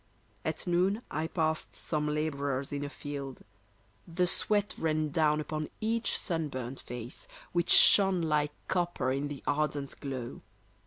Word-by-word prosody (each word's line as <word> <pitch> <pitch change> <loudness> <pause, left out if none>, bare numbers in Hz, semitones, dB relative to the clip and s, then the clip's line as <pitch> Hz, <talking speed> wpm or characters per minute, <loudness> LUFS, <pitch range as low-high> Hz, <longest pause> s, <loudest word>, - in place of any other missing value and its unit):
At - - -2
noon 185 +5 +1
I 155 +2 -2
passed 160 -2 -1
some 150 -2 -2
labourers 140 -3 -2
in 145 0 -3
a 145 - -4
field. 140 -2 -7 0.6
The 180 +1 0
sweat 205 +3 +2
ran 155 -1 0
down 150 0 +2
upon 155 0 -4
each 225 +1 +1
sunburnt 135 - -3
face, 120 +1 -8 0.2
Which 175 0 0
shone 190 -3 +8
like 150 -2 +1 0.2
copper 175 -7 0
in 140 +2 -1
the 145 -1 -8
ardent 145 -1 -1
glow. 130 -4 -6
150 Hz, 140 wpm, -30 LUFS, 140-175 Hz, 0.6 s, shone